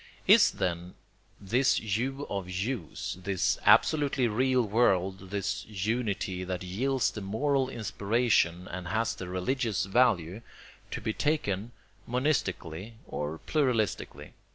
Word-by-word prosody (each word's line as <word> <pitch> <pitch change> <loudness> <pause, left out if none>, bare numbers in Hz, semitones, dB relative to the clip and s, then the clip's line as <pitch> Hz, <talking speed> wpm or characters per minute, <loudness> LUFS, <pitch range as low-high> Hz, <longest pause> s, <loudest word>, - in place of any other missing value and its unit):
Is - - +7
then 85 0 -3 0.4
this 120 +7 +2
you 125 +7 -2
of 100 -2 -4
yous, 95 - -3
this 95 -1 0
absolutely 140 -5 +4
real 130 +3 +2
world, 95 -4 +1
this 100 -1 -2
unity 105 -3 -2
that 90 0 -4
yields 125 +8 0
the 105 - -7
moral 130 +7 0
inspiration 105 -5 +1
and 90 0 -6
has 110 +4 0
the 95 - -7
religious 105 +4 -1
value, 95 -3 +2 0.5
to - - -5
be 110 +1 -2
taken 115 -9 -1 0.4
monistically 115 - -1
or 75 +2 -4
pluralistically? 125 -9 -1
105 Hz, 115 wpm, -29 LUFS, 95-125 Hz, 0.5 s, Is